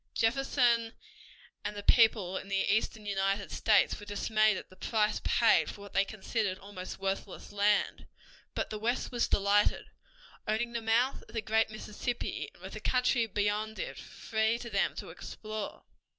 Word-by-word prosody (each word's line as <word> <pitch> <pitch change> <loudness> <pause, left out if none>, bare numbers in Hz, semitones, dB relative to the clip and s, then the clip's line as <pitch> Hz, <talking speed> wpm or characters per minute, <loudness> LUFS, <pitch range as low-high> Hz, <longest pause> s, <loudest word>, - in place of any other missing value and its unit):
Jefferson 235 -1 +2 0.7
and 210 0 -3
the 205 - -6
people 215 -6 +4
in 190 - -4
the 195 0 +1
eastern 220 -1 -2
United 195 0 0
States 215 -2 +3
were 205 - -10
dismayed 215 0 +2
at - - -7
the - - -14
price 215 +1 0
paid - - +4
for 205 - -9
what 200 -1 -11
they 195 - +4
considered 205 -1 -2
almost 195 -2 -8
worthless 195 0 -4
land, 205 0 +1 0.5
but - - -2
the 215 - -4
West 240 +4 -1
was 240 -1 +1
delighted, 200 +1 +2 0.6
owning 230 +3 0
the 235 - -2
mouth 230 +4 +2
of - - -13
the - - +1
great 220 +1 +2
Mississippi 215 +3 -4
and - - -18
with - - -7
the - - -5
country 250 -2 +2
beyond 210 +1 -1
it - - -4
free 220 0 -1
to 235 -1 -8
them 200 -1 +1
to - - -7
explore. 215 -1 -6
215 Hz, 165 wpm, -31 LUFS, 200-230 Hz, 0.7 s, people